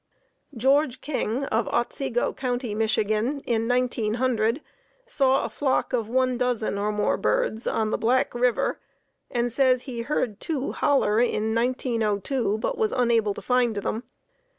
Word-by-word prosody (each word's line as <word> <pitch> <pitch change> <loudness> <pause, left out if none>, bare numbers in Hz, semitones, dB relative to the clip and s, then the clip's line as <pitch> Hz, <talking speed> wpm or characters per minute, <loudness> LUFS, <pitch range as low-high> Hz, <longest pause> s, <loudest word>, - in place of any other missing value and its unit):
George 265 +2 +2
King 265 -3 -2
of 225 -3 0
Otsego 240 0 -1
County, 245 -3 -2
Mich., 220 +1 +1
in 220 +7 0 0.2
1900 245 0 0 0.4
saw 270 - +2
a - - -1
flock 270 -2 -1
of 230 -3 0
one 255 0 +1
dozen 235 -5 0
or 210 +1 0
more 210 0 0
birds 375 - 0
on 215 -1 0
the - - -1
Black 245 +3 +2
River, 245 0 +1 0.5
and 240 -1 0
he - - -1
says 255 0 +2
he 245 -4 -5
heard 230 -5 -2
two 285 -4 -2
"holler" 230 -7 +2
in 220 -2 +1
1902, 230 -2 0
but 475 - -3
was 440 -1 +2
unable 230 -5 +2
to - - -8
find 250 -3 +2
them. 205 +2 -2
245 Hz, 150 wpm, -25 LUFS, 220-260 Hz, 0.5 s, George